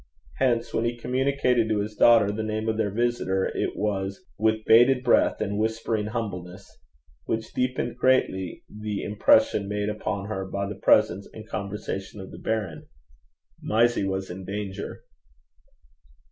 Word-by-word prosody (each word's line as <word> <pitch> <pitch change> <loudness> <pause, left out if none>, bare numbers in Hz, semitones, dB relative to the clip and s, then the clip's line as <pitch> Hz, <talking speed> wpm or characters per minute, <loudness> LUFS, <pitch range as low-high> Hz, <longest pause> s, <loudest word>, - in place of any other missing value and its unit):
Hence 120 -3 +1
when 115 - +1
he 120 0 -1
communicated 125 -2 +1
to 110 - +1
his 105 +1 -2
daughter 115 -2 +6
the 105 +2 -3
name 110 0 -2
of 110 - +1
their 110 -2 0
visitor, 105 -3 0
it - - -1
was 100 -2 -2
'with 110 0 +1
bated 125 +3 +6
breath 120 - +3
and 100 0 -2
whispering 110 -1 -1
humbleness,' 95 -5 -6 0.5
which 110 0 -3
deepened 125 -1 -1
greatly 95 -8 +1
the 105 -1 -5
impression 105 -1 +3
made 105 0 -1
upon 100 -2 -3
her 100 -2 -3
by 100 +1 -3
the 105 - -4
presence 105 0 +3
and 110 0 -10
conversation 100 -1 -5
of 95 - -9
the - - -10
baron. 105 -8 -3 0.7
Mysie 115 0 +2
was 95 -1 -3
in 95 +2 -7
danger. 100 +1 -5
105 Hz, 145 wpm, -26 LUFS, 100-115 Hz, 0.7 s, daughter